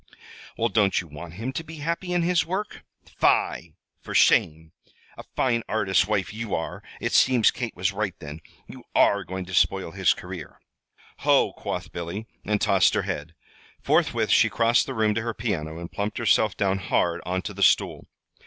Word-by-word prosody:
"Well, 115 +1 +1
don't 105 -4 +2
you 90 - -5
want 80 +3 -10
him 115 +7 -4
to 165 - -4
be 160 0 -10
happy 170 +4 -3
in 175 -1 +1
his 170 -2 +2
work? 190 +6 -4 0.2
Fie! - - 0 0.2
For - - -8
shame! 80 +1 +3 0.4
A - - -9
fine 115 -3 +1
artist's 95 -4 +2
wife 100 -5 -1
you 110 -2 -3
are. - - -5 0.2
It - - -2
seems 125 -4 +5
Kate 120 -3 -5
was 95 +2 0
right, 100 -3 -2
then; 75 0 -9 0.2
you - - -12
are 100 0 +4
going 95 +1 -6
to 90 - -10
spoil 95 -1 +2
his 95 +1 +2
career!" 90 -2 -9 0.6
"Ho!" - - +3
quoth - - -5
Billy, 85 +6 -5 0.2
and 105 0 0
tossed - - +3
her - - +1
head. 80 +3 -5 0.5
Forthwith - - +1
she - - +5
crossed 115 +1 +2
the - - -5
room 110 -1 +2
to 110 - -1
her 115 0 -4
piano 80 -8 -3
and 85 0 -8
plumped 105 +1 -3
herself 110 -3 +2
down 95 -2 +1
hard 85 -2 0
on 90 +1 -2
to 105 - -5
the 100 - -8
stool. 95 - +2
100 Hz, 185 wpm, -25 LUFS, 90-115 Hz, 0.6 s, seems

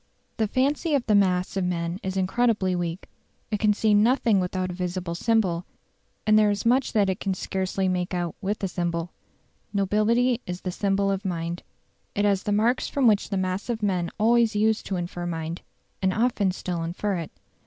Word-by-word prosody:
The 220 - +1
fancy 285 - +1
of 265 - 0
the 215 - +2
mass 185 -3 +2
of 195 - 0
men 175 0 -2
is 190 0 -3
incredibly 190 -1 +1
weak; 175 0 -3 0.4
it 210 - 0
can 210 0 +4
see 210 +1 +2
nothing 225 0 +4
without 185 0 -2
a - - -5
visible 180 -1 -3
symbol, 180 -3 +1 0.6
and 215 0 +5
there 210 -1 +4
is 205 +1 -1
much 250 +3 +2
that 205 -3 +3
it 190 0 -1
can 195 -1 -1
scarcely 190 +1 -2
make 180 -1 -1
out 175 -3 -2
with 205 +1 -2
a - - +2
symbol. 175 -1 -2 0.6
Nobility 225 +5 +2
is 180 0 -5
the 185 - -3
symbol 195 +1 +1
of 195 +1 -2
mind. 170 -2 -3 0.5
It 205 - +1
has 200 -2 +2
the 205 - -2
marks 225 +5 +2
from 275 -2 0
which 210 -3 +3
the 200 - -1
mass 185 +3 -2
of 225 -2 -2
men 180 -4 0
always 230 0 +3
used 220 +1 +1
to 195 - -2
infer 175 0 -4
mind, 165 0 -4 0.4
and 190 0 +2
often 220 -2 +1
still 180 -2 -4
infer 180 +4 -2
it. 165 -2 -5
195 Hz, 195 wpm, -25 LUFS, 180-215 Hz, 0.6 s, and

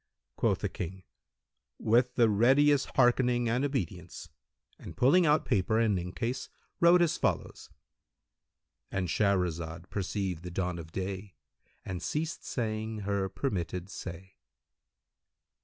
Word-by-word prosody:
Quoth - - +1
the - - 0
boy, 95 +2 -6 0.7
"With 120 +3 +2
the 120 -2 +5
readiest 135 +7 +4
hearkening 120 -1 +3
and 120 +4 +1
obedience," 95 - -4 0.5
and - - -10
pulling 165 +7 +5
out 150 -1 +3
paper 110 -3 +1
and 110 -3 +3
inkcase[FN#175] 115 +9 -4 0.3
wrote 170 +1 +6
as 165 - +1
follows:—And 95 -2 -6
Shahrazad 85 -4 -1
perceived 95 -3 -2
the 90 - -7
dawn 90 0 -2
of 80 -1 -9
day 95 +1 -5 0.5
and 90 -2 -4
ceased 160 +2 -3
saying 110 -2 -3
her 100 -1 -1
permitted 95 -3 -3
say. 95 +2 -8
105 Hz, 115 wpm, -30 LUFS, 90-125 Hz, 0.7 s, wrote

